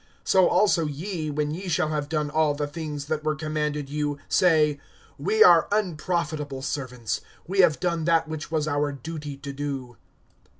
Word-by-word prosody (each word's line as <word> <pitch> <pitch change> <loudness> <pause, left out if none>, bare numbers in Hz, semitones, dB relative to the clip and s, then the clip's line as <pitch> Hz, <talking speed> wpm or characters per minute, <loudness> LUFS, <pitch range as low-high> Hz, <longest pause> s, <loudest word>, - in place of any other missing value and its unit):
(10)So 190 -2 +5
also 175 -6 +3
ye, 155 +2 -4
when 150 0 -1
ye 185 +5 -5
shall 155 -3 +1
have 150 -2 -2
done 150 -2 -1
all 155 -1 +2
the 145 0 -1
things 145 -1 -5
that 155 0 -2
were 155 0 0
commanded 150 -2 -2
you, 145 0 -2
say, 155 -5 +3 0.4
We 440 +1 +4
are - - +7
unprofitable 155 -8 -1
servants; 125 -6 -3 0.2
we 195 +3 -3
have 165 -5 +5
done 170 -3 -1
that 165 -1 +3
which 155 -1 -5
was 155 -1 0
our 145 0 0
duty 145 +1 -7
to 140 0 -7
do. 135 -4 -5
150 Hz, 170 wpm, -25 LUFS, 145-165 Hz, 0.4 s, are